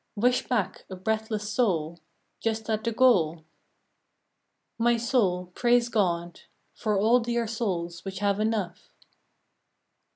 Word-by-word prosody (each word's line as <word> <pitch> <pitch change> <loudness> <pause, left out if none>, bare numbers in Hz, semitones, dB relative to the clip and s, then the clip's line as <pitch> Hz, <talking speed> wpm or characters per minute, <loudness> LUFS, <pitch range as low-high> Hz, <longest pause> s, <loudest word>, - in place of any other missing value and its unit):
Wish 245 +4 +1
back 235 -7 -1
a 190 - -6
breathless 215 +2 -2
soul 170 -8 0 0.4
Just 220 0 -2
at 215 0 -1
the 230 - 0
goal? 175 -10 +3 1.3
My 235 +1 +3
soul, 200 -7 0
praise 240 +1 +2
God 175 -6 -1 0.3
For 210 -2 -1
all 225 +5 +4
dear 235 0 -1
souls 180 -7 -3
which 195 -1 -6
have 200 0 0
enough. 215 -5 -2
215 Hz, 120 wpm, -27 LUFS, 180-230 Hz, 1.3 s, all